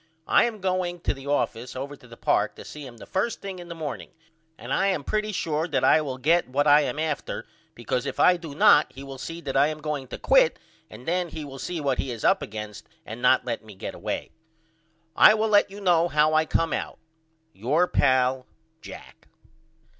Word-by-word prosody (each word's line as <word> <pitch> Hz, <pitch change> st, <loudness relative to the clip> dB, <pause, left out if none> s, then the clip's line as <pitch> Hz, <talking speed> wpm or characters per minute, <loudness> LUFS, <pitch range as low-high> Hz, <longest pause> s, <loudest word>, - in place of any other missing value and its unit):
I -, -, +5 dB
am 220 Hz, -4 st, -4 dB
going 185 Hz, -1 st, -1 dB
to -, -, 0 dB
the 135 Hz, 0 st, -11 dB
office 125 Hz, -4 st, -2 dB
over 140 Hz, +2 st, -5 dB
to 125 Hz, -, -18 dB
the 115 Hz, -1 st, -13 dB
park -, -, +1 dB
to -, -, -11 dB
see 150 Hz, -2 st, -9 dB
him 120 Hz, -2 st, -13 dB
the -, -, -11 dB
first 210 Hz, +5 st, -2 dB
thing 195 Hz, -2 st, -7 dB
in 175 Hz, -, -10 dB
the 170 Hz, -, -7 dB
morning 155 Hz, -4 st, -6 dB, 0.5 s
and -, -, -5 dB
I 195 Hz, -, +2 dB
am 185 Hz, -7 st, 0 dB
pretty 215 Hz, +6 st, -1 dB
sure 160 Hz, -4 st, -1 dB
that 150 Hz, -, -1 dB
I 155 Hz, -, +5 dB
will 135 Hz, -4 st, -4 dB
get 160 Hz, +4 st, +2 dB
what 145 Hz, +3 st, +1 dB
I 145 Hz, 0 st, +6 dB
am 135 Hz, -1 st, -3 dB
after 155 Hz, -2 st, -3 dB, 0.3 s
because 125 Hz, +1 st, -2 dB
if -, -, -5 dB
I 180 Hz, -, +6 dB
do 165 Hz, -5 st, -8 dB
not 150 Hz, 0 st, +5 dB
he 135 Hz, -, -10 dB
will 135 Hz, -1 st, -9 dB
see 165 Hz, +5 st, -6 dB
that 135 Hz, -, -5 dB
I 140 Hz, +2 st, +5 dB
am 155 Hz, 0 st, -4 dB
going 150 Hz, -3 st, -4 dB
to -, -, -7 dB
quit -, -, +4 dB, 0.3 s
and 125 Hz, -, -13 dB
then 175 Hz, +1 st, 0 dB
he 155 Hz, -1 st, -7 dB
will 135 Hz, -1 st, -9 dB
see 175 Hz, +4 st, -4 dB
what 140 Hz, -3 st, -1 dB
he 135 Hz, -, -2 dB
is 115 Hz, -3 st, -6 dB
up -, -, +4 dB
against 105 Hz, -1 st, -8 dB, 0.2 s
and 115 Hz, +3 st, -8 dB
not 125 Hz, 0 st, +4 dB
let 115 Hz, -2 st, -3 dB
me 105 Hz, -2 st, -13 dB
get 95 Hz, -, -6 dB
away. -, -, -5 dB, 0.8 s
I 215 Hz, -, +8 dB
will 220 Hz, 0 st, 0 dB
let 205 Hz, -1 st, +4 dB
you 200 Hz, +1 st, -10 dB
know 175 Hz, -4 st, +3 dB
how 155 Hz, -1 st, +2 dB
I 155 Hz, 0 st, +3 dB
come 165 Hz, 0 st, 0 dB
out. -, -, -4 dB, 0.6 s
Your 145 Hz, -, +1 dB
pal, 130 Hz, -2 st, +2 dB, 0.3 s
JACK. -, -, -12 dB
150 Hz, 220 wpm, -25 LUFS, 130-175 Hz, 0.8 s, I